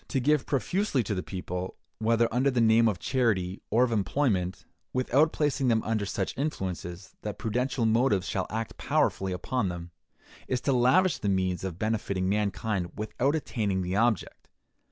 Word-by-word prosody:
To 135 - 0
give 145 +2 +2
profusely 145 - 0
to 105 - -2
the 90 - -2
people, 90 -1 -5 0.2
whether 115 +1 +3
under 130 +3 +3
the 125 -2 0
name 115 0 +5
of 105 -4 +1
charity 100 -6 0
or 115 +4 +4
of 125 - +1
employment, 100 -4 0 0.3
without 135 +5 +3
placing 145 -3 0
them 115 -2 +3
under 110 -2 -1
such 95 -1 -2
influences 95 - -4
that 105 -1 -5
prudential 125 +2 -1
motives 110 -4 +2
shall 95 - -1
act 110 0 -4
powerfully 95 -1 +1
upon 100 +4 -1
them, 85 -1 -7 0.6
is 130 - 0
to 140 - +1
lavish 135 +9 +4
the 100 - -1
means 95 -2 0
of 90 -3 -4
benefiting 100 -3 -1
mankind 100 -2 -1
without 120 +7 0
attaining 105 -11 -1
the 90 +1 -2
object. 110 -2 0
110 Hz, 165 wpm, -28 LUFS, 95-125 Hz, 0.6 s, name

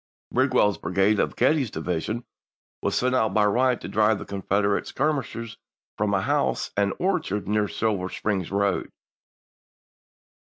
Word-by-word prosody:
Bid 130 +2 +2
well's 105 -5 +3
brigade 95 +3 +2
of - - 0
Getty's 135 0 +2
division 90 +9 -3 0.6
was - - -1
sent 130 +1 +1
out 110 -6 +1
by 105 -1 +4
Wright 125 +4 +2
to - - -6
drive 110 0 +2
the - - -7
Confederate 100 +1 0
skirmishers 120 -6 -2 0.4
from 105 -1 0
a 95 - +1
house - - 0
and 100 -1 +1
orchard 170 - -1
near 105 0 +1
the - - -12
Silver 100 -5 -1
Spring 100 -1 -1
road. 100 -1 0
105 Hz, 145 wpm, -25 LUFS, 100-125 Hz, 0.6 s, by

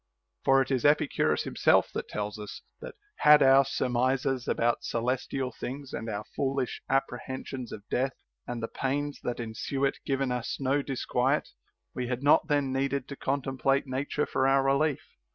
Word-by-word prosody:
For 135 0 +5
it - - -8
is 130 -3 +1
Epicurus 145 -1 +2
himself - - +3
that - - -4
tells 105 0 -4
us 105 - -8 0.2
that, - - -9 0.2
had 150 -1 +7
our 135 +1 +7
surmises 130 0 0
about 120 +1 +1
celestial 125 +2 -2
things 135 +3 -7
and 115 - -4
our 105 -1 -3
foolish 135 -2 -1
appre 135 -2 0
hensions 130 -2 -6
of 105 -1 -9
death 130 +1 0 0.3
and 120 -2 -4
the - - -1
pains 145 +3 -2
that 120 - -3
ensue 120 +4 -2
it 135 - -1
given 135 -2 -1
us 125 -2 -2
no 135 +1 +1
disquiet, 135 +1 0 0.4
we 125 -1 -3
had 125 +2 -3
not 150 +2 +5
then 145 -3 +1
needed 135 0 -1
to 140 - -6
contemplate 135 0 0
nature 140 +3 -2
for 130 - +1
our 135 0 +4
relief. 140 +1 +1
135 Hz, 170 wpm, -28 LUFS, 125-140 Hz, 0.4 s, had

